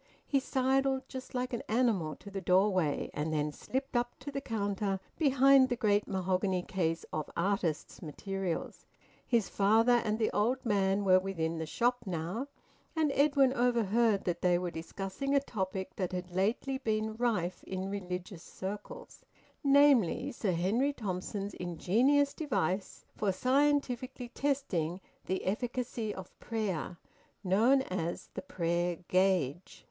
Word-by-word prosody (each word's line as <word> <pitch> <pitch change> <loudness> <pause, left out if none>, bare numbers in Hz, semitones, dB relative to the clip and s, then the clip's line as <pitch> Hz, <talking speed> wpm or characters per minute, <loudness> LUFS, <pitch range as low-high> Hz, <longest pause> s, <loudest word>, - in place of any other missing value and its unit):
He 275 - +2
sidled, 265 0 +1
just 260 -1 -8
like 250 0 -2
an 240 - -2
animal, 215 - +1
to 200 - -12
the 195 0 -4
doorway, 185 -4 +2
and 150 +2 -2
then 150 -1 0
slipped 265 - -4
up 240 0 0
to 285 +2 -6
the 275 0 -3
counter, 200 -4 -1 0.2
behind 275 -2 +5
the 245 - +1
great 210 -3 +2
mahogany 185 -1 0
case 165 -3 -1
of 155 -1 -2
`artists' 175 -4 -1
materials.' 185 +3 -4 0.4
His 230 -5 +2
father 225 +4 +4
and 215 0 0
the 220 -1 +1
old 245 +6 0
man 200 -2 +2
were 185 -1 +6
within 165 -4 -2
the 160 - -3
shop 245 +8 +1
now, 180 - -3 0.5
and 310 -3 +2
Edwin 280 -2 +4
overheard 235 -4 +2
that 175 -1 -2
they 180 -1 +4
were 175 0 -3
discussing 195 - -3
a - - +6
topic 190 -7 -4
that 185 -2 -2
had 180 0 -4
lately 220 +8 0
been 215 -1 -1
rife 210 -7 -1
in 190 0 -4
religious 180 -2 -5
circles, 205 - -8 0.4
namely, 280 - +4
Sir 210 -6 -1
Henry 220 +12 +1
Thompson's 200 -2 -4
ingenious 240 - +2
device 195 - -2
for 205 -2 +1
scientifically 255 +1 +1
testing 220 - -1 0.3
the 190 - -2
efficacy 235 +1 -2
of 190 -3 -10
prayer, 200 -7 -3 0.5
known 230 +9 +4
as 170 -6 -4
the - - -5
`Prayer 175 - -2
Gauge.' 185 -4 +1
205 Hz, 140 wpm, -31 LUFS, 180-250 Hz, 0.5 s, were